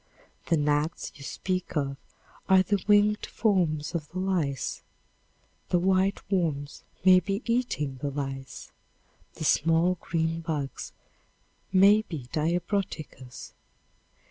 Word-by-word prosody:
The 165 - +3
gnats 150 +2 0
you 145 - -15
speak 185 +3 -3
of 140 -2 -1 0.5
are 190 0 +6
the 200 0 0
winged 210 0 +4
forms 175 -9 0
of 155 -4 -3
the 180 - -8
lice; 175 -8 -1 0.9
the 180 - +3
white 190 +2 +1
worms 150 -7 -1 0.2
may 185 -1 +8
be 195 +4 -3
eating 230 - -1
the 145 - -1
lice; 135 -1 -6 0.6
the - - -6
"small 165 +4 +3
green 165 0 -1
bugs" 150 -4 -4 0.8
may 200 +3 +6
be 160 - -7
diabroticas. 165 - -3
170 Hz, 115 wpm, -27 LUFS, 150-190 Hz, 0.9 s, may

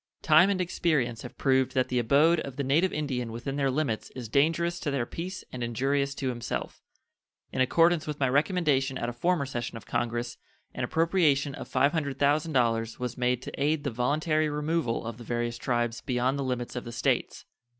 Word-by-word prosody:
Time 160 +4 +6
and 195 -2 0
experience 155 -10 0
have - - -10
proved 130 -1 +2
that 130 -1 +2
the 125 - +1
abode 145 +8 +4
of 135 -4 -6
the 140 - -2
native 155 +8 +2
Indian 130 -6 -2
within 120 +4 -4
their 140 -1 +1
limits 130 -5 -1
is 125 -3 -6
dangerous 165 +7 +1
to 155 - -2
their 140 -4 0
peace 180 +8 -6
and 125 -1 -5
injurious 135 +4 0
to 135 -2 -2
himself. 120 -1 -4 0.7
In - - -1
accordance 165 +5 +3
with 150 -1 -4
my 135 - +2
recommendation 140 -2 +1
at 120 - -2
a - - -5
former 170 +4 +1
session 120 -3 -4
of 110 - -12
Congress, 120 0 -2 0.4
an - - -4
appropriation 160 -5 +2
of - - -8
$500 140 -1 +1
thousand 130 -7 +1
was 125 -2 -4
made 125 0 0
to - - -6
aid 150 0 +1
the 140 - -2
voluntary 155 +6 +1
removal 150 -5 -1
of 115 -1 -5
the - - -8
various 120 0 -2
tribes 120 -2 -1
beyond 130 +1 0
the - - -1
limits 125 -2 -3
of 125 - -3
the 120 - -7
States. 115 - -1
135 Hz, 190 wpm, -28 LUFS, 120-155 Hz, 0.7 s, Time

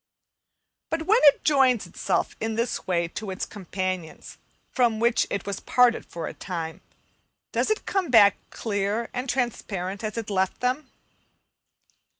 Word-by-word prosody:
But 325 0 -1
when 430 +8 +4
it 285 - +6
joins 265 -5 +4
itself - - -1
in 225 0 -2
this 230 +1 -2
way 170 -2 +1
to 205 +3 -6
its 190 - -3
companions, 185 -4 -5 0.3
from 235 -4 +2
whom 235 +1 +3 0.2
it 200 - -3
was 200 -1 -3
parted 245 -1 +3
for 170 -1 -6
a - - -5
time, 165 -3 -5 0.7
does - - 0
it 435 - 0
come 380 -5 -1
back 210 -5 +7
clear 210 +1 -2
and 250 +1 -3
transparent 200 -6 -2
as 215 +1 -4
it 225 -2 -4
left 190 -1 0
them? 255 +3 -1
220 Hz, 150 wpm, -25 LUFS, 190-250 Hz, 0.7 s, back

